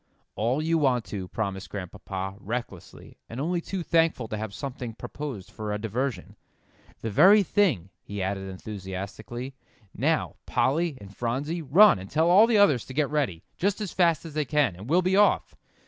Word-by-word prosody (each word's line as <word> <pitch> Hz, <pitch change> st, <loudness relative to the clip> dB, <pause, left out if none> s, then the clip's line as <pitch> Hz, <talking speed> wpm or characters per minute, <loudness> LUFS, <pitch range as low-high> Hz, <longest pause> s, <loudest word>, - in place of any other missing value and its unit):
"All 125 Hz, +8 st, 0 dB
you 165 Hz, +1 st, +2 dB
want 130 Hz, -5 st, +2 dB
to," 95 Hz, -3 st, -4 dB
promised 95 Hz, -2 st, -4 dB
Grandpapa, 95 Hz, 0 st, -6 dB
recklessly, 110 Hz, -4 st, -7 dB
and 115 Hz, -, -6 dB
only 170 Hz, +4 st, -1 dB
too 185 Hz, +1 st, -4 dB
thankful 165 Hz, -8 st, +2 dB
to -, -, -3 dB
have 110 Hz, -1 st, -4 dB
something 125 Hz, -1 st, -6 dB
proposed 130 Hz, -7 st, -7 dB
for 105 Hz, -1 st, -5 dB
a 105 Hz, -, -1 dB
diversion. 115 Hz, +5 st, -3 dB, 0.7 s
"The 115 Hz, -, -3 dB
very 200 Hz, -, +7 dB
thing," 155 Hz, -, +1 dB
he 100 Hz, 0 st, -7 dB
added 95 Hz, 0 st, -3 dB
enthusiastically. 100 Hz, +6 st, -7 dB, 0.4 s
"Now, -, -, 0 dB
Polly 160 Hz, +1 st, +1 dB
and 100 Hz, -1 st, -12 dB
Phronsie, 140 Hz, +8 st, -2 dB
run 175 Hz, -, +6 dB
and 95 Hz, +1 st, -9 dB
tell 160 Hz, +3 st, +2 dB
all 205 Hz, +5 st, +7 dB
the 230 Hz, -2 st, +3 dB
others 150 Hz, -, +4 dB
to 130 Hz, -, -10 dB
get 150 Hz, -1 st, +1 dB
ready, 135 Hz, -, -1 dB
just 200 Hz, +3 st, 0 dB
as 210 Hz, -4 st, -4 dB
fast 170 Hz, -4 st, +2 dB
as 160 Hz, -, -8 dB
they 150 Hz, 0 st, 0 dB
can, 145 Hz, -, +1 dB
and 100 Hz, +7 st, -10 dB
we'll 180 Hz, +3 st, +4 dB
be 185 Hz, +1 st, +2 dB
off. 205 Hz, +1 st, +3 dB
130 Hz, 180 wpm, -26 LUFS, 100-165 Hz, 0.7 s, very